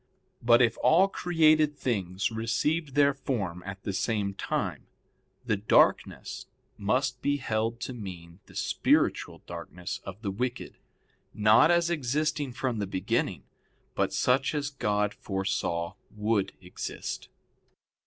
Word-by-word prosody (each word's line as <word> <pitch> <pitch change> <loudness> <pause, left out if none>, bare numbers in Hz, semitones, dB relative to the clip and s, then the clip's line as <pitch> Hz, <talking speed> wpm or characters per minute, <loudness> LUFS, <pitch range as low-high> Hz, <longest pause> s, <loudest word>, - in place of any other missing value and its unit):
But 120 +1 +6
if 115 -2 +1
all 180 +5 +5
created 155 -5 +3
things 100 -6 -1
received 130 +7 -1
their 140 -1 +5
form 105 -11 -3
at 95 0 -7
the 100 - -3
same 100 -1 -1
time, - - -3 0.6
the 110 - +1
darkness 105 +2 +2 0.3
must 125 +4 0
be 145 0 +1
held 115 -2 -1
to 130 - -4
mean 90 -6 -9
the - - -16
spiritual - - +1
darkness 85 +1 -6
of 95 +4 -9
the 100 - -1
wicked, 125 +5 -4 0.6
not 110 +7 +6
as 170 0 +3
existing 150 -1 -1
from 125 -3 -2
the 100 - -2
beginning 95 -1 -1 0.5
but - - 0
such 130 +3 +2
as 145 -1 -2
God 105 -6 0
foresaw 95 -3 -2 0.2
would 105 -2 0
exist. 90 -1 -6
115 Hz, 125 wpm, -28 LUFS, 100-140 Hz, 0.6 s, But